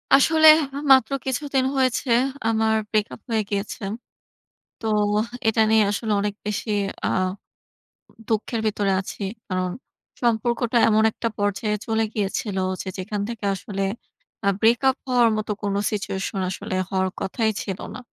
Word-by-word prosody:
আসলে 315 +3 +5 0.3
হা - - -5
মাত্র 265 -2 +6
কিছুদিন 265 0 0
হয়েছে, 255 0 +1 0.4
আমার 220 0 +2
ব্রেক 215 -1 +1
আপ - - -19
হয়ে 220 -2 +1
গিয়েছে। 200 +1 -3 1.0
তো 225 - -4 0.3
হা 230 +3 -1
এটা 220 0 +3
নিয়ে 220 -1 +5
আসলে 215 +1 -2
অনেক 205 0 -2
বেশি 210 +1 -3 0.4
আ - - +2 1.2
দুঃখের 220 +1 -1
ভিতরে 205 -2 0
আছি। 195 - -7 0.3
কারণ 185 -1 -1 0.5
সম্পর্কটা 235 +1 +1
এমন 215 0 +4
একটা 230 - -3
পর্যায়ে 205 +1 0
চলে 225 -1 +1
গিয়েছিল, 200 -1 -2 0.2
যে - - -9
যেখান 200 +2 -3
থেকে 225 -3 -5
আসলে 195 0 -4 0.6
আ - - +2
ব্রেক 230 +2 +4
আপ 260 - +1
হওয়ার 245 -2 +4
মতো 215 0 -3
কোন 200 -1 0 0.2
সিচুয়েশন 195 -1 -3
আসলে 185 0 -4
হওয়ার 190 -1 0
কথাই 220 +3 0
ছিল 195 -1 -5 0.2
না। - - -7
220 Hz, 145 wpm, -23 LUFS, 200-235 Hz, 1.2 s, মাত্র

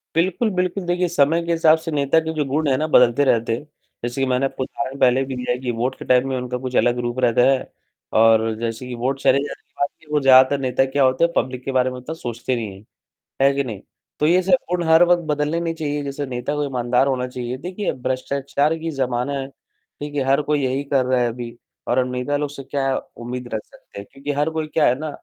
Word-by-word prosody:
बिल्कुल, 190 +6 +1
बिल्कुल, 180 +1 -1
देखिए, 175 0 +1
समय 165 +1 +2
के 170 - 0
हिसाब 160 -1 +4
से 160 - -6
नेता 145 +1 +2
के 160 - -2
जो 150 -2 0
गुण 145 +2 -1
हैं 130 - +3
ना, 155 - 0
बदलते 125 -1 +4
रहते 115 -2 +2
हैं, - - -8 0.4
जैसे 120 +3 -3
कि 135 - +2
मैंने 130 +2 +2
आपको 135 - -4
उदाहरण 135 +1 -5
पहले 130 +1 +4
भी 130 -1 -5
दिया 125 0 -1
है 125 - -3
कि 125 -1 -3
वोट 130 +2 0
के - - -8
टाइम 125 +1 +3
में 130 - -1
उनका 125 0 -3
कुछ 130 -1 -4
अलग 120 0 +3
रूप 120 +2 -4
रहता 120 0 +3
है 135 -1 0 0.5
और 115 0 +4
जैसे 115 +2 -4
कि 125 - -5
वोट 130 +3 -2
चले 135 - +4
जाने - - -8
के 150 +2 -6
बाद 150 -2 +2
ज़्यादातर 130 +1 +6
नेता 130 0 +1
क्या 135 +1 0
होते 130 +5 +3
हैं, 170 - +1
पब्लिक 125 0 -1
के 135 - -3
बारे 130 0 +2
में 125 - -7
इतना 160 +6 -6
सोचते 125 -2 -3
नहीं 110 -3 -4
हैं, 100 - -16 0.6
है 140 0 +5
कि 140 0 0
नहीं? 110 -6 -6 0.4
तो 150 - +3
ये 180 +2 +4
सब 185 -1 +5
गुण 180 -1 0
हर 160 +2 +7
वक़्त 175 0 +3
बदलने 150 +3 0
नहीं 165 -1 -2
चाहिए, 145 -2 -3
जैसे 140 +1 -4
नेता 125 +3 -3
को 150 - -1
ईमानदार 125 0 +1
होना 125 -2 -1
चाहिए। 125 0 -5
देखिए, 185 +7 -3
भ्रष्टाचार 140 +4 -1
की 165 +1 -4
ज़माना 130 0 -1
है, 135 - -4
ठीक 145 +2 -12
है? 140 - +1
हर 135 +2 +2
कोई 150 -1 +2
यही 130 +2 -1
कर 130 -2 +3
रहा 130 -1 +2
है 120 - +2
अभी 120 0 -7 0.3
और 125 +1 +2
नेता 125 +3 -2
लोग 145 -1 -2
से 140 -1 -9
क्या 135 -1 -1 0.2
उम्मीद 125 +1 -6
रख 110 - -1
सकते - - -14
हैं? 100 - -8
क्योंकि 140 +1 -5
हर 150 +2 +2
कोई 155 - -3
क्या 155 0 +2
है 125 +3 +1
ना, 155 0 -4
135 Hz, 245 wpm, -21 LUFS, 125-150 Hz, 0.6 s, हर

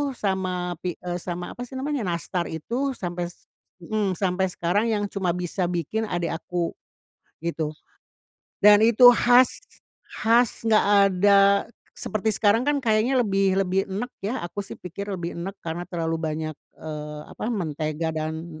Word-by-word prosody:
sama 185 -4 -2
pi 175 -2 -3
eee, 175 0 -3
sama 175 0 -5
apa 245 0 -7
sih 265 - -11
namanya, 265 -5 -2
nastar 170 +1 -2
itu 245 - -3
sampai 175 -1 -3
se 175 - -16 0.4
mhm, 200 0 -1
sampai 190 +1 0
sekarang 180 +5 0
yang 210 -2 0
cuma 180 -3 -1
bisa 180 0 -2
bikin 180 +6 -2
adek 175 -3 -2
aku 175 -1 -2 0.7
gitu 160 -2 -2 0.9
dan 210 +1 +7
itu 235 +2 +8
khas 245 +1 +5 0.7
khas 230 +1 +3
enggak 215 -1 +5 0.2
ada 200 +2 +4 0.6
seperti 215 0 -2
sekarang 210 +2 +3
kan 290 - +3
kayaknya 225 +4 +2
lebih 195 -1 +2
lebih 195 0 +1
enek 220 +7 -4
ya, 215 +6 -2
aku 190 +4 -5
sih 200 - -8
pikir 190 +3 -7
lebih 175 -4 -3
enek 190 +4 -6
karena 170 +2 -4
terlalu 165 -2 -2
banyak, 155 0 -3 0.2
eee, 150 -1 -6
apa, - - -4
mentega 160 -6 -2
dan 160 +1 -5
185 Hz, 150 wpm, -25 LUFS, 170-215 Hz, 0.9 s, itu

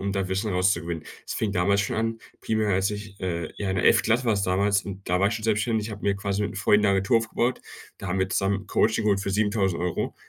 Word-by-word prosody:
um 100 0 -2
das 95 -2 -1
Wissen 100 +3 -1
rauszugewinnen.“ 85 -3 0 0.2
Es - - -4
fing 110 - -1
damals 100 +3 +2
schon 100 - -2
an, 115 0 -1 0.2
primär 110 -1 0
als 95 +1 +2
ich, 105 -1 -7
äh 85 -3 -2
ja, 100 -2 -2
in 95 - -1
der - - 0
11. - - +5
Klasse 120 +3 +2
war 110 - +3
es 100 - -1
damals 100 +2 +2
und 100 -1 -8
da 90 - +2
war 100 +2 +3
ich 105 - -2
schon 115 -1 -5
selbstständig. 110 0 +1
Ich 110 - -7
habe 105 - -9
mir 100 -1 +1
quasi 100 +1 -2
mit'm 95 - -5
Freund 105 0 +3
'ne 105 - +3
Agentur 95 +4 +3
aufgebaut. 115 +2 -1 0.4
Da 100 - -7
haben 95 - -1
wir 95 - +1
zusammen 100 +1 0
Coaching 110 0 +2
geholt 100 -2 +2
für 100 - -3
7.000€. 95 -4 0
100 Hz, 255 wpm, -25 LUFS, 95-105 Hz, 0.4 s, 11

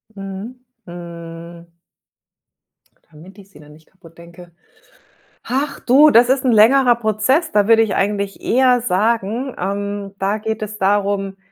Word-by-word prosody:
Mhm. 200 +6 -9 0.2
Hm. 170 0 -11 1.4
Damit 170 +6 -16
ich 195 -1 -16
sie 150 - -18
dann 150 0 -16
nicht 155 +1 -21
kaputt 165 -3 -20
denke. 170 +1 -15 0.9
Ach 275 +3 -3
du, 285 +5 +5
das 240 +2 +5
ist 265 0 +1
'n 250 - +3
längerer 240 +3 +5
Prozess, 230 - 0
da 205 0 +2
würde 225 0 +5
ich 220 - -1
eigentlich 200 0 -2
eher 250 0 +2
sagen, 225 +4 -1
ähm, 200 +1 -4
da 200 +2 -1
geht 220 0 -5
es 215 0 -6
darum, 195 0 -1
205 Hz, 140 wpm, -18 LUFS, 185-235 Hz, 1.4 s, du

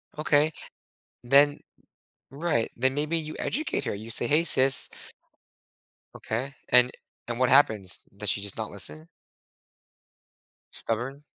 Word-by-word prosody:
Okay. 150 0 +2 0.7
Then 140 +3 +4 0.7
Right, 140 -5 -1
then 130 +3 0
maybe 150 +3 -2
you 155 -1 -6
educate 310 +3 -2
her, - - -2
you 110 +3 -10
say, 120 - +1
"Hey, 155 +5 +2
sis" 135 -4 +6 1.3
Okay, 130 +5 -5 0.2
and 125 0 +5 0.4
and 120 0 -5
what 130 -1 +2
happens? 110 -9 +2 0.2
Does 105 0 -4
she 100 - -1
just 100 -1 -5
not - - -5
listen? 80 +2 -5 1.7
Stubborn? 130 +6 -4
130 Hz, 120 wpm, -26 LUFS, 115-145 Hz, 1.7 s, sis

